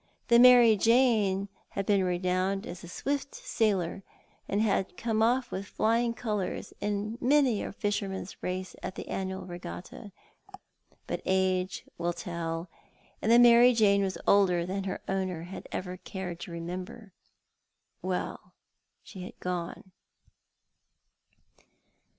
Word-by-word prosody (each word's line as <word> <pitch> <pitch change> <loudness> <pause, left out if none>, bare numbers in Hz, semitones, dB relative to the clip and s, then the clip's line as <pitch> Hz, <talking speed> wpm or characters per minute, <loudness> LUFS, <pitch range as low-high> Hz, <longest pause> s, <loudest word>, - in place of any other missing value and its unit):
The 235 0 +7
Mary 245 -2 +8
Jane 220 -4 +3 0.2
had 195 - -3
been 200 -2 +3
renowned 185 +2 0
as 180 -7 -8
a - - -8
swift 280 +10 -3
sailer, 210 - 0 0.5
and 200 - 0
had 205 -3 0
come 225 -2 0
off 245 +3 +2
with 195 +1 -4
flying 230 +1 +1
colours 210 -5 -3
in 210 +2 -2
many 265 -4 +3
a - - -4
fisherman's 200 -2 -3
race 185 +1 -4
at 185 - -5
the - - -7
annual 190 0 -4
regatta; 180 +3 -8 0.9
but - - -4
age 185 -1 0
will 175 0 0
tell, 170 -1 -4 0.5
and 220 - +1
the 235 - +8
Mary 240 +1 +7
Jane 200 -3 +4
was 190 -1 -1
older 180 -4 +4
than 195 +2 -3
her 190 - -4
owner 185 -3 -2
had 180 +3 -9
ever 185 0 -4
cared 180 -2 -6
to 175 - -8
remember. 180 +5 -7 0.9
Well, - - -4 0.5
she 190 - -10
had 180 - -9
gone. 180 +1 -5
195 Hz, 130 wpm, -29 LUFS, 185-225 Hz, 0.9 s, Mary